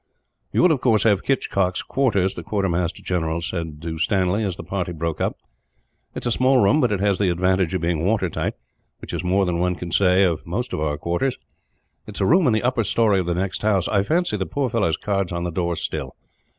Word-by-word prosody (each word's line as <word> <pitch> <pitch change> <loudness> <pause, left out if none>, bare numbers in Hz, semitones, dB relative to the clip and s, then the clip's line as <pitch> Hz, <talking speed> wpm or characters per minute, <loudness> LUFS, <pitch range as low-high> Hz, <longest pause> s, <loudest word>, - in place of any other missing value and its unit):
"You - - +2
will, 180 - +6
of 140 -5 0
course, 110 -4 +3
have 105 -4 +3
Hitchcock's 95 -9 0
quarters," 100 -9 +1
the - - -7
quartermaster 90 -2 -1
general 85 -2 -1
said 85 -3 -4
to 80 -1 -4
Stanley, 95 +3 +1
as 95 -4 -2
the - - -8
party 90 0 -3
broke 80 0 -3
up. - - -1 0.8
"It - - -5
is 120 - +1
a - - -1
small 130 +1 +3
room, 125 +7 +4
but 125 -4 +2
it 100 - 0
has 100 -1 +1
the 100 -3 +2
advantage 95 0 +1
of 90 - -1
being 85 -1 0
water 100 0 +1
tight, 85 - -3 0.4
which - - -9
is - - -3
more 95 +2 +2
than 85 -1 -1
one 90 0 +1
can 85 -1 -7
say 95 +1 +4
of 85 -5 0
most 120 +9 -4
of - - -2
our 75 -1 -1
quarters. 85 - -1 0.7
It 105 - -8
is - - -3
a - - +3
room 170 - +4
in 120 - +3
the 110 - 0
upper 125 -2 +1
storey 105 -1 +2
of 90 - -2
the 85 - 0
next 95 +1 -2
house. 100 -4 +1
I 100 - +2
fancy 160 - 0
the 95 - -3
poor 140 -3 -2
fellow's 100 -9 +1
card 100 -2 -1
is - - -11
on 85 0 -3
the 90 - -2
door 85 0 -1
still. - - -4
95 Hz, 240 wpm, -22 LUFS, 85-110 Hz, 0.8 s, will